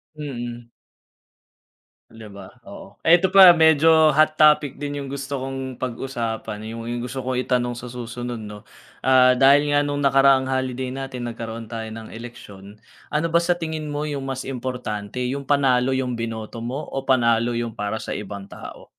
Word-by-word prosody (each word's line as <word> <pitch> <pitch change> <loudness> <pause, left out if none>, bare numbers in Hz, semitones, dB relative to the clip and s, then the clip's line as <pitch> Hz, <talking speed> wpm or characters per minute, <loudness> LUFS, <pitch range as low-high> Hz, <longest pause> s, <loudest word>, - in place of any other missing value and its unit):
Mm. 120 -5 -7 1.4
Di 115 0 -13
ba, 100 -1 -11 0.2
oo. 100 - -12
Eto 175 +3 +5
pa, 190 -2 +11
medyo 160 -1 +5
hot 155 +1 +3
topic 150 -3 +4
din 145 0 -4
yung 135 - -8
gusto 140 -1 -4
kong 135 -1 -5
pag-usapan 115 -4 -4
yung 115 0 -7
yung 120 0 -3
gusto 130 +2 -5
kong 130 0 -3
itanong 125 -1 -1
sa 120 0 -8
susunod 120 0 -6
no. 105 -1 -9 0.4
Ah, 130 -1 +5
dahil 140 +3 +5
nga 145 - +3
nung 145 0 -2
nakaraang 135 -1 +4
holiday 130 -1 -2
natin 130 -2 -5
nagkaroon 115 -1 -7
tayo 115 0 -5
ng 110 0 -8
eleksyon 105 -3 -11 0.3
ano 155 +2 0
ba 170 +1 +3
sa 175 0 0
tingin 155 -2 -4
mo 150 +1 -3
yung 140 -2 -4
mas 135 -1 -5
importante, 125 -4 -5
yung 140 +2 -3
panalo 135 -2 +2
yung 130 -2 -1
binoto 115 0 -6
mo 130 +5 -4
o 135 0 -4
panalo 120 -3 +2
yung 115 -1 -3
para 105 0 -3
sa - - -5
ibang 100 -1 -7
tao? - - -11
130 Hz, 170 wpm, -22 LUFS, 115-140 Hz, 1.4 s, pa